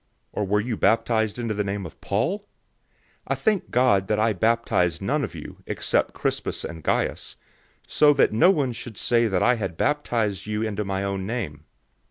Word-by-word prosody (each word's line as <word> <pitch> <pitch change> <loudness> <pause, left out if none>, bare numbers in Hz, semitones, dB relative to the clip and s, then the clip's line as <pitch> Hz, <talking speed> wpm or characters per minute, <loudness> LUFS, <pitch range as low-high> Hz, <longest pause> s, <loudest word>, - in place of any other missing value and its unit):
Or 105 - -2
were 105 +2 +2
you 115 +2 -2
baptized 110 0 +1
into 115 -3 -2
the 105 0 -1
name 100 -1 -3
of 80 - -11
Paul? 115 - 0
001:014 205 - -32 0.8
I - - 0
thank 210 -3 0
God 110 -7 +3
that 105 - +1
I 110 +1 +2
baptized 100 -5 +1
none 140 +9 0
of 110 - -5
you, - - -9
except - - 0
Crispus - - -2
and 80 -2 -7
Gaius, - - -1 0.5
001:015 - - -22
so 150 -1 +5
that 140 - +3
no 165 +12 +5
one 140 -9 +1
should 115 -2 -8
say 120 -1 +2
that 95 -2 +1
I 125 +3 +4
had 95 -6 -4
baptized 110 -9 0
you 105 +1 -1
into 105 -1 -2
my 95 -1 -2
own 100 -1 -3
name. 85 -11 -4
110 Hz, 195 wpm, -24 LUFS, 100-120 Hz, 0.8 s, so